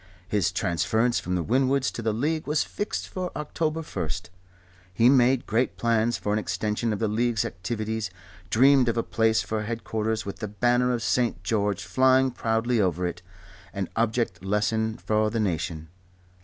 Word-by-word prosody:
His 100 -4 +1
transference 110 +8 +1
from 90 +1 -3
the 90 - 0
Winwoods 130 - +2
to - - -6
the 110 -1 0
League 150 +8 -1
was 150 +1 +2
fixed 205 - -4
for 185 -1 -4
October 155 +1 -2
1. 80 - -4 0.8
He 115 +6 +4
made 130 -1 +4
great 120 +4 0
plans 115 0 +1
for 105 - -2
an 105 - +2
extension 110 +1 -1
of 105 - -1
the 110 - 0
League's, 115 0 +1
activities, 110 +3 -3 0.4
dreamed 130 +1 +5
of 115 - -1
a 115 - +1
palace 110 -1 +2
for 110 -1 -2
headquarters 110 0 -2
with 100 - -6
the 105 - -3
banner 120 +4 +2
of 120 -3 -1
St. 120 +3 0
George 105 -4 0
flying 130 0 +3
proudly 115 0 0
over 90 -2 0
it, 90 0 -4 0.5
an 100 -2 -3
object 115 -5 0
lesson 110 +3 0
for 110 -2 +1
the 115 +1 -2
nation. 80 -5 -2
110 Hz, 170 wpm, -26 LUFS, 105-125 Hz, 0.8 s, dreamed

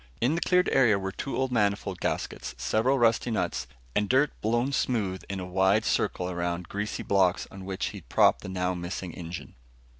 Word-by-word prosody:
In 125 +6 +2
the 170 - -1
cleared 180 0 +3
area, 120 -6 +5
were 95 0 -3
two 135 +8 -4
old 130 -1 0
manifold 105 -4 0
gaskets, 60 - -3
several 110 - +2
rusty 115 0 +3
nuts, 110 - -1 0.3
and 105 -1 +1
dirt 135 +4 +4
blown 120 +5 +1
smooth 105 -9 0
in 100 -1 -3
a 90 - -4
wide 95 +4 +2
circle 90 - 0
around 85 -1 -2
greasy 105 +1 -3
blocks 95 -2 +2
on 95 -1 -9
which 95 -1 -2
he'd - - -11
propped - - +4
the - - -7
now 90 -1 -1
missing 90 0 -5
engine. 85 0 -7
100 Hz, 185 wpm, -28 LUFS, 90-120 Hz, 0.3 s, area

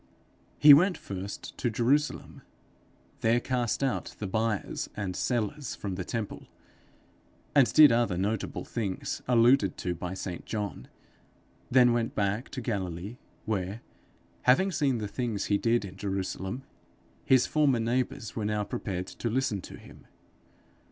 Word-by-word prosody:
He 150 -1 +10
went 180 +6 +5
first 100 +1 -7
to 120 - +1
Jerusalem, 130 +7 0 0.8
there 115 +2 +3
cast 125 0 -1
out 135 - -2
the 105 - -5
buyers 110 +1 -2
and 95 -3 -3
sellers 125 +3 -2
from 100 -2 -5
the 90 0 -3
temple, 115 +1 -5 1.1
and 140 -4 +5
did 155 -3 +8
other 115 -6 +1
notable 105 +3 -2
things 100 -5 -3
alluded 120 -4 +4
to 90 - -2
by 90 +2 -5
St 90 -2 -5
John; 105 -3 -4 0.8
then 125 -1 +5
went 115 -1 -1
back 100 +4 -1
to 130 - -6
Galilee, 100 -1 -4 0.3
where, 100 +1 -2 0.6
having 190 +10 +4
seen 140 -7 +1
the 105 -2 -3
things 110 -2 -2
he 100 -1 +1
did 115 -2 +1
in 95 0 -10
Jerusalem, 95 +4 -3 0.6
his 130 -1 +4
former 145 -5 +2
neighbours 115 -1 -2
were 110 - -2
now 105 0 0
prepared 90 -3 -4
to 115 - -4
listen 115 -5 0
to - - -10
him. - - -16
115 Hz, 140 wpm, -28 LUFS, 100-125 Hz, 1.1 s, He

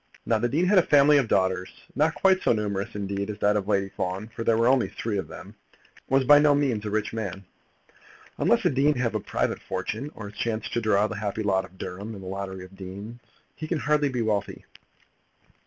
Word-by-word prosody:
Now 115 -2 +2
the 120 +2 0
dean 160 +8 +1
had 190 +1 +5
a - - +6
family 145 -2 +5
of 130 - 0
daughters, 95 -2 +1 0.2
not 155 +3 +1
quite 190 -1 +3
so - - +3
numerous 100 -3 -3
indeed 100 0 -3
as 105 - -4
that 105 0 +2
of 100 -2 -1
Lady 100 -2 +1
Fawn, 95 +2 -4
for 115 - -4
there 115 -1 +2
were 115 +1 +3
only 130 -1 +3
three 105 -3 -3
of - - -5
them, - - -10 0.2
and - - -27
was 135 - +2
by 145 +3 +7
no 145 -1 +5
means 130 -7 0
a 105 - -3
rich 105 +1 -2
man. 100 -4 -5 0.9
Unless - - +2
a - - +4
dean 140 +3 +2
have 120 -2 -1
a 110 - 0
private - - -2
fortune, 105 +9 -4
or 105 -2 -7
has 105 - -14
chanced 115 -1 -2
to 120 - 0
draw 105 -2 +3
the 110 0 -4
happy 105 +1 -3
lot 95 -2 +1
of 95 - -18
Durham 100 +6 -6
in 100 - -9
the 95 - -9
lottery 95 -1 -5
of 95 +1 -16
deans, 100 +5 -8 0.4
he 155 - -6
can 170 - -1
hardly 150 -1 +1
be 125 -3 -1
wealthy. 105 -2 -2
110 Hz, 230 wpm, -26 LUFS, 100-130 Hz, 0.9 s, by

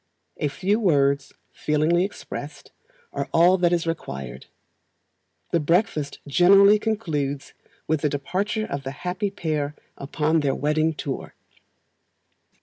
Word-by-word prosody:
A 150 - 0
few 195 +9 0
words, 140 -8 +2 0.2
feelingly 155 +4 +1
expressed, 200 - -7 0.4
are - - -3
all 180 +3 +5
that 175 -1 +3
is 170 -1 +1
required. 70 - -5 1.0
The 170 - +2
breakfast 155 -3 0
generally 195 +7 +6
concludes 150 -11 -2 0.3
with 155 -2 0
the 150 - +1
departure 200 +10 -2
of 140 -7 -4
the 135 - -4 0.2
happy 180 +3 -1
pair 155 -6 -3 0.2
upon 150 +3 0
their 140 -3 0
wedding 155 +2 +1
tour. 140 -2 -5
160 Hz, 120 wpm, -24 LUFS, 145-185 Hz, 1.0 s, generally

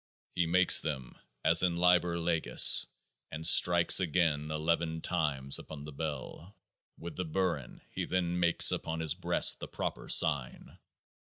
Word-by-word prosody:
He 85 -2 -2
makes 90 +2 +3
them 65 -5 -7 0.3
as 80 +1 +5
in 90 -2 -2
Liber 90 -1 0
Legis, 85 -1 +4 0.4
and 80 +1 -8
strikes 85 +2 +4
again 80 -4 -2
Eleven 80 +1 -4
times 75 -7 -3
upon 75 -2 -12
the 75 - -11
Bell. 80 +5 -9 0.4
With 85 -2 -11
the 90 - -4
Burin 85 -5 -5
he - - -6
then 90 -1 -4
makes 85 -1 +3
upon 80 0 -6
his 80 -2 -3
breast - - +2
the - - -9
proper - - -8
sign. 65 -4 0
80 Hz, 145 wpm, -28 LUFS, 75-90 Hz, 0.4 s, as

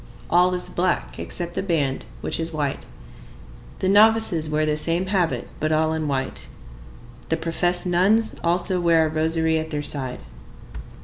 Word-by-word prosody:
All 180 +1 +4
is 180 - -5
black 180 0 -1
except 175 -1 -5
the - - -2
band, 155 -8 -1 0.2
which - - -3
is 165 0 -1
white. 145 -3 -2 1.0
The 185 - 0
novices 205 -5 +4
wear 155 0 +1
the 150 0 0
same 165 +4 0
habit, 175 - -1
but 155 +1 -1
all 155 0 +1
in 160 -1 -2
white. 135 -2 -3 0.8
The 160 - +1
professed 175 +2 -1
nuns 195 +6 +2
also 175 +1 +2
wear 165 -2 +4
a - - -1
rosary 160 +1 +1
at 160 0 -5
their 150 -1 -3
side. 130 -4 -1
165 Hz, 160 wpm, -23 LUFS, 155-180 Hz, 1.0 s, All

